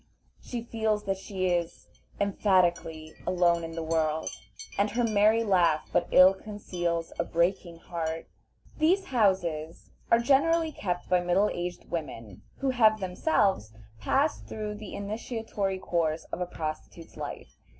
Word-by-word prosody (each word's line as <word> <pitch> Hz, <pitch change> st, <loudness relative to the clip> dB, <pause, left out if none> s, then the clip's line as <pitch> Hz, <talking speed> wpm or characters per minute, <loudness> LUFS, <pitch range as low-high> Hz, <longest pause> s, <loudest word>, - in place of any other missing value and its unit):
She 240 Hz, -2 st, -5 dB
feels 220 Hz, -2 st, -1 dB
that 195 Hz, -1 st, -2 dB
she 190 Hz, -1 st, -3 dB
is, 175 Hz, -1 st, -2 dB, 0.3 s
emphatically, 175 Hz, -6 st, +1 dB
alone 175 Hz, -2 st, +3 dB
in 165 Hz, 0 st, -6 dB
the 165 Hz, 0 st, -4 dB
world, 160 Hz, -1 st, 0 dB, 0.4 s
and 200 Hz, +1 st, +2 dB
her 240 Hz, +4 st, 0 dB
merry 220 Hz, 0 st, +4 dB
laugh 175 Hz, -7 st, +2 dB
but 175 Hz, -, +2 dB
ill 185 Hz, +1 st, +8 dB
conceals 175 Hz, -5 st, -4 dB
a -, -, +3 dB
breaking 170 Hz, 0 st, 0 dB
heart. 165 Hz, -1 st, -4 dB, 0.5 s
These 365 Hz, +5 st, +3 dB
houses 175 Hz, -8 st, 0 dB, 0.2 s
are 230 Hz, -, +6 dB
generally 315 Hz, +7 st, +3 dB
kept 180 Hz, -10 st, -3 dB
by 180 Hz, -1 st, +3 dB
middle 180 Hz, +4 st, +2 dB
aged 175 Hz, 0 st, -5 dB
women 115 Hz, -, -5 dB, 0.2 s
who 270 Hz, -1 st, +2 dB
have 220 Hz, -4 st, +4 dB
themselves 190 Hz, -, +1 dB, 0.3 s
passed 280 Hz, -, 0 dB
through 210 Hz, -1 st, -4 dB
the 210 Hz, -2 st, -8 dB
initiatory 210 Hz, -1 st, -3 dB
course 165 Hz, -3 st, -1 dB
of -, -, -4 dB
a 180 Hz, -, -1 dB
prostitute's 160 Hz, 0 st, -6 dB
life. -, -, -7 dB
185 Hz, 140 wpm, -28 LUFS, 170-215 Hz, 0.5 s, ill